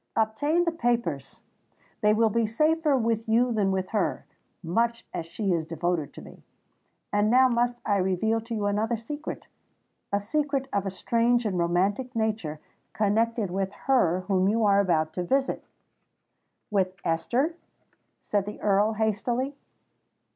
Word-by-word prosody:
"Obtain 290 +10 +1
the 340 - +1
papers—they 210 - -3
will 220 +1 +3
be 230 +1 +1
safer 305 +5 +2
with 225 -1 -1
you 240 +2 +3
than 205 -3 +1
with 190 -1 -1
her, 210 -4 -1 0.4
much 230 +7 0
as 165 - -4
she 195 +2 -1
is 165 -2 0
devoted 165 -1 -2
to - - -11
me. - - -14 0.7
And 205 +1 +3
now 260 +2 +6
must 240 0 +1
I 205 -2 +2
reveal 195 +4 +1
to 230 +1 -5
you 210 -2 -2
another 215 +3 0
secret—a 230 -5 -7
secret 275 +4 -1
of 200 -1 0
a - - 0
strange 235 +5 +1
and 190 -4 -1
romantic 195 +9 0
nature, 215 -9 -1 0.3
connected 220 -1 +1
with 190 +1 -1
her 185 -10 +3
whom 190 0 +1
you 225 +1 +2
are 200 -1 +5
about 160 -5 +1
to 180 - -2
visit——" 270 +9 0 1.0
"With 190 -2 +1
Esther?" 245 - 0 0.7
said 205 -1 -1
the 210 - -6
Earl 210 +2 +2
hastily. 235 +5 -1
215 Hz, 145 wpm, -27 LUFS, 190-240 Hz, 1.0 s, now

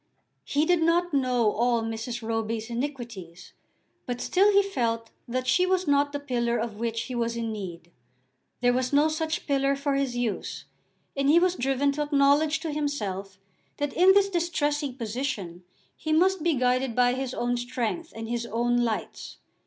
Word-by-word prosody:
He 290 +2 +1
did 350 0 +3
not 340 +1 +2
know 250 -5 +2
all 235 +1 +1
Mrs. 225 +1 -4
Roby's 225 0 -2
iniquities; 235 - -6 0.5
but 245 -1 -3
still 395 +3 +3
he 400 0 +5
felt 230 -11 -2 0.2
that 255 +1 -2
she 365 +7 +3
was 370 0 +1
not 285 0 +3
the 285 - -3
pillar 240 -4 -1
of 225 -2 -4
which 230 0 -2
he 255 - -6
was 235 -1 -1
in 230 -1 -2
need. 175 -5 -7 0.7
There 245 0 +4
was 255 0 0
no 290 +2 +4
such 315 +1 -2
pillar 275 -1 +1
for 280 0 -1
his 275 -3 -1
use, 240 -4 -3 0.5
and 275 0 +1
he 315 - +6
was 360 +1 +4
driven 270 -1 +1
to 295 +2 -3
acknowledge 295 +1 +3
to 325 - -3
himself 205 -10 -3 0.4
that 290 -1 -2
in 370 +2 +6
this 400 0 +4
distressing 295 -6 -1
position 215 -7 -4 0.3
he 315 - -4
must 365 +3 +3
be 330 -1 +2
guided 255 -1 +1
by 245 0 +4
his 260 0 -3
own 245 0 0
strength, 245 +6 -3
and 225 0 -6
his 235 0 -3
own 240 +2 +1
lights. 235 -3 -3
255 Hz, 175 wpm, -26 LUFS, 230-295 Hz, 0.7 s, he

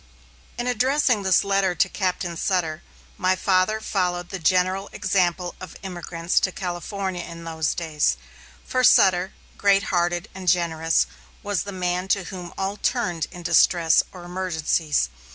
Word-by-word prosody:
In 240 - -2
addressing 250 -1 +2
this 190 -1 +3
letter 195 -2 +1
to - - +3
Captain 180 -3 -2
Sutter, 165 -3 -1 0.4
my 185 0 +2
father 185 +3 +2
followed 180 -4 -1
the 195 - -5
general 185 +3 +1
example 180 -2 0
of 185 - -9
emigrants 175 -2 -1
to 190 - 0
California 185 +1 -4
in 170 0 -9
those 160 -1 -2
days, 155 - 0 0.5
for 255 0 0
Sutter, 190 -6 +5 0.3
great 200 -1 +4
hearted 175 0 +1
and 190 -1 -9
generous, 165 -2 +2 0.4
was 205 -4 -1
the 200 - -5
man 180 0 -2
to 195 0 +1
whom 180 -2 -8
all 195 +2 -2
turned 175 - -1
in 175 -1 -10
distress 170 -1 +4
or 180 -2 -11
emergencies. 165 - 0
180 Hz, 145 wpm, -23 LUFS, 170-195 Hz, 0.5 s, Sutter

